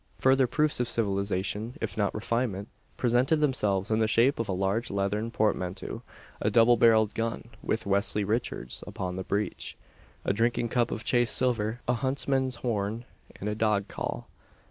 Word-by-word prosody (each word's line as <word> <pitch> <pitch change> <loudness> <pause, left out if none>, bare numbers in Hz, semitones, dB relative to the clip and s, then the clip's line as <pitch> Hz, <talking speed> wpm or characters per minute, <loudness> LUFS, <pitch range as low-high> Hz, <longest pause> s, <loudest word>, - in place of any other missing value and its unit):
Further 130 0 +4
proofs 150 +3 +1
of 125 - +1
civilisation, 100 +1 -1
if - - -3
not 100 -2 0
refinement, 110 -2 -2 0.3
presented 125 +5 +3
themselves 110 -10 0
in 110 - +3
the 110 - +3
shape 115 +5 +3
of 115 -2 -2
a - - +1
large 95 +5 0
leathern 100 +3 -1
portmanteau, 100 -5 -1 0.4
a - - +2
double 120 +1 +6
barrelled 110 -2 +4
gun, 115 0 -3
with 110 - -1
"Westley 100 +1 +1
Richards" 105 - -3
upon 90 -1 -4
the 95 - -4
breech; 100 +3 -2 0.5
a - - +2
drinking 115 +2 +1
cup 120 0 +1
of 110 - -4
chased 120 0 +2
silver, 120 -2 0
a 125 - +3
huntsman's 130 0 0
horn, 110 0 -1 0.3
and 100 - -6
a 105 - 0
dog 105 -2 +1
call. - - -4
110 Hz, 165 wpm, -28 LUFS, 100-120 Hz, 0.5 s, double